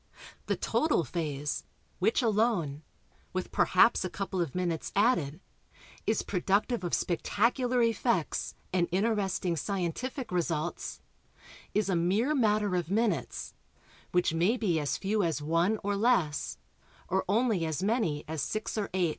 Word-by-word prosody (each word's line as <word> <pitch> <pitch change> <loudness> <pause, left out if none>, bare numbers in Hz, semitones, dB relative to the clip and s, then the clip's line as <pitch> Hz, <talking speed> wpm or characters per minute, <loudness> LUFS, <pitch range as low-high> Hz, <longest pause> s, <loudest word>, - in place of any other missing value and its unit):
The - - +1
total 305 - +1
phase 150 -1 -3 0.4
which 220 +7 +2
alone 210 -10 +1 0.5
(with 185 0 -3
perhaps 225 +5 +4
a 185 - -2
couple 190 -1 -3
of 165 -6 -3
minutes 175 -3 -1
added) 195 - +2 0.7
is 220 - +1
productive 200 +4 0
of 175 - +1
spectacular 240 - +1
effects, 230 -6 0 0.2
and 175 -2 +2
interesting 195 -3 0
scientific 200 - -3
results 170 -2 -2 0.7
is 210 -1 +2
a 190 - +1
mere 200 - +2
matter 210 -7 +2
of 175 -2 -1
minutes 205 -5 -1 0.6
which 180 -2 +2
may 180 +9 +2
be 180 -9 +1
as 145 -2 -1
few 210 +2 0
as 165 -5 0
one 165 +8 +1
(or 205 0 0
less), 200 -9 +1 0.5
or 190 +1 +1
only 220 -4 +2
as 160 +2 -2
many 205 -9 0
as 160 -1 -3
6 215 +8 -2
or 205 - -2
8. 180 -3 +2
190 Hz, 140 wpm, -30 LUFS, 170-220 Hz, 0.7 s, perhaps